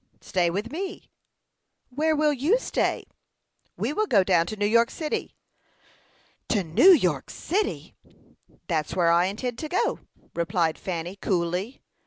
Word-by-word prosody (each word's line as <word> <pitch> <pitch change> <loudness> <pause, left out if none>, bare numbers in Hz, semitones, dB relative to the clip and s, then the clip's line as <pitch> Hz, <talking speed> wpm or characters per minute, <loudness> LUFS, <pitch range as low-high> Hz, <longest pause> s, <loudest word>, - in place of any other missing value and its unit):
"Stay 180 -3 0
with 205 +7 -3
me." 375 +5 -6 0.8
"Where 310 +4 +1
will 300 0 +2
you 295 - +2
stay?" - - -1 0.7
"We - - -1
will 430 +5 0
go 200 - +4
down 175 -3 +2
to 215 - -4
New 205 -1 -1
York 230 +2 +4
city." 310 -2 -4 1.1
"To 205 -5 +1
New 170 - +5
York 180 - +2
city!" 400 +5 -3 0.7
"That's 160 -4 -2
where 170 -2 +3
I 170 +1 +4
intend 230 +5 -4
to 310 - -5
go," 360 - 0 0.3
replied 170 -1 0
Fanny, 175 +1 -5
coolly. 180 +6 -2
205 Hz, 140 wpm, -25 LUFS, -, 1.1 s, New